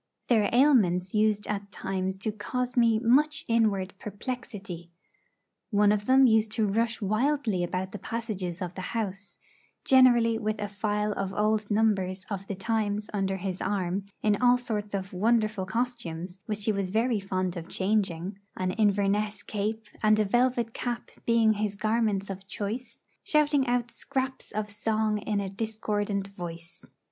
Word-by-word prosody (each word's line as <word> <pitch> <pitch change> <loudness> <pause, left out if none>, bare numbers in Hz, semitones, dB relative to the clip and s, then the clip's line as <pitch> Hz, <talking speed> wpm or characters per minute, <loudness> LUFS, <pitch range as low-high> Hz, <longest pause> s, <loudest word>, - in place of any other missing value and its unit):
Their 220 -4 +4
ailments 210 -9 +4
used 210 -1 +2
at 200 -1 -4
times 190 0 -3
to 215 - +1
cause 245 +4 -3
me 230 -3 +4
much 300 +8 +3
inward 210 -5 +1
perplexity. 205 -5 -6 0.8
One 205 -1 +4
of 210 0 0
them 265 +1 +6
used 220 -2 +3
to 220 -1 +2
rush 230 +3 0
wildly 215 -2 +1
about 185 +2 -2
the 210 - -7
passages 195 -5 -4
of 175 0 -5
the 185 - -6 0.2
house 200 -2 -4 0.5
generally 240 -4 +5
with 215 -1 -2
a 205 - -2
file 210 +1 -1
of 195 -1 -3
old 215 0 +1
numbers 200 -3 +1
of 195 -1 -4
the 200 - -3
'Times' 210 +1 -1
under 195 -1 0
his 190 0 -4
arm, 195 0 -1 0.2
in 210 -1 +4
all 250 0 +6
sorts 210 -4 -3
of 190 -1 -4
wonderful 215 -1 +1
costumes, 190 -6 -3
which 210 -1 -3
he 220 - +3
was 200 -2 -1
very 225 +2 +1
fond 185 -2 -2
of 170 0 -7
changing, 190 -2 0 0.2
an 185 0 0
Inverness 205 0 +1
cape 215 +1 -3 0.2
and 215 0 +4
a 215 - +3
velvet 240 +1 +1
cap 240 -1 -4 0.2
being 230 -2 +4
his 210 -1 -2
garments 215 -2 0
of 195 0 -8
choice 215 +6 -5 0.2
shouting 295 -3 +3
out 240 -1 0
scraps 265 -1 -4
of 210 0 -3
song 215 0 0
in 210 0 -1
a 200 - -2
discordant 205 -1 -2
voice. 170 -3 -9
210 Hz, 155 wpm, -28 LUFS, 195-230 Hz, 0.8 s, them